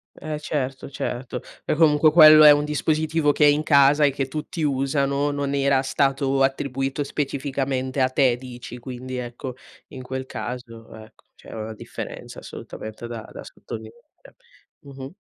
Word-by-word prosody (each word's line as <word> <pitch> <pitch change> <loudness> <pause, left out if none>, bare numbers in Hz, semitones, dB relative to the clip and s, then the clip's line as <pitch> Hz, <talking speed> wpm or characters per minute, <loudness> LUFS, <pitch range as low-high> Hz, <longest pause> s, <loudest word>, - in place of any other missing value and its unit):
Eh 155 0 -5
certo, 135 -3 -4
certo. 125 -1 -4 0.2
Beh - - -1
comunque 155 -1 +4
quello 155 -1 +9
è 150 - +10
un 145 0 +3
dispositivo 155 0 +1
che 150 - +3
è - - +7
in 145 +1 +3
casa 145 0 +5
e 140 - +3
che 135 0 -3
tutti 155 +3 -5
usano, 140 0 0
non 140 -1 -2
era 140 -1 +2
stato 135 0 0
attribuito 135 +1 -1
specificamente 135 -2 -2
a 130 - +3
te 130 -2 +3
dici, 125 -1 -10
quindi 130 +1 -7
ecco 125 +1 -6 0.4
in 130 - -9
quel 130 +1 -5
caso 120 -3 -7
ecco 110 0 -15
c'era 110 - -10
una 110 +1 -6
differenza - - -8
assolutamente 110 +2 -9
da 115 -2 -6
da - - -9
sottolineare. 475 +1 -10 0.7
Mh-mh. 135 0 -10
135 Hz, 155 wpm, -23 LUFS, 130-145 Hz, 0.7 s, è